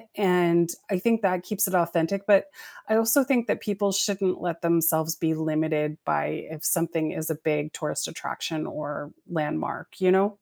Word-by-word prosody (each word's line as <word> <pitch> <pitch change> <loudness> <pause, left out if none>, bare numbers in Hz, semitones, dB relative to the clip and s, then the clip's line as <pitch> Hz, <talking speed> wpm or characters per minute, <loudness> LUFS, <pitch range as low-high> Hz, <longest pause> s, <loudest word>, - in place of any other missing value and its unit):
And 175 -3 +3 0.2
I 180 - +1
think 230 +2 +2
that 185 -2 +1
keeps 210 +1 0
it 190 - -5
authentic, 170 +2 +1
but, 200 -2 +6 0.5
I - - +3
also 225 +5 +4
think 250 -3 +4
that - - -1
people 200 0 +1
shouldn't 195 -2 0
let 170 -1 -3
themselves 165 -1 +2
be 160 -1 0 0.2
limited 155 -1 0 0.2
by 75 - +1 0.3
if 150 - -12
something 165 -2 +1
is 160 - -3
a 160 - -1 0.2
big 150 -1 +1
tourist 150 - -2
attraction 160 0 -4
or 145 0 -6 0.3
landmark, 150 - -3 0.2
you 185 - +6
know? 190 +2 +5
170 Hz, 175 wpm, -26 LUFS, 160-195 Hz, 0.5 s, but